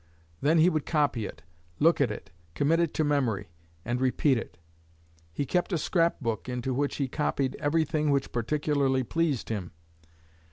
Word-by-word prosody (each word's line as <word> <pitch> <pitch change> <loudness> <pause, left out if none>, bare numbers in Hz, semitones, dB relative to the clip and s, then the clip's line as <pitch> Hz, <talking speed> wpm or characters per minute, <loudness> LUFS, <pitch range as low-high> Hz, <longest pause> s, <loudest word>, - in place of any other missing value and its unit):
Then 155 +4 +3
he 160 +2 +6
would 155 -5 0
copy 145 -9 +1
it, - - -11 0.3
look 165 0 +4
at 135 - +3
it, 80 -6 -7 0.2
commit 160 +4 +2
it 170 -3 +1
to 155 - +2
memory, 125 -9 0 0.4
and 120 +2 -1
repeat 130 +2 +3
it. 115 - -5 0.7
He 140 - -2
kept 180 +7 0
a 175 - +1
scrap 170 +2 +1
book 115 -2 -3
into 125 +1 -2
which 140 +2 -1
he 140 - -1
copied 135 -1 -1
everything 155 0 +1
which 140 -2 +1
particularly 135 +1 +1
pleased 155 -1 -1
him." 100 -6 -4
140 Hz, 165 wpm, -28 LUFS, 125-155 Hz, 0.7 s, he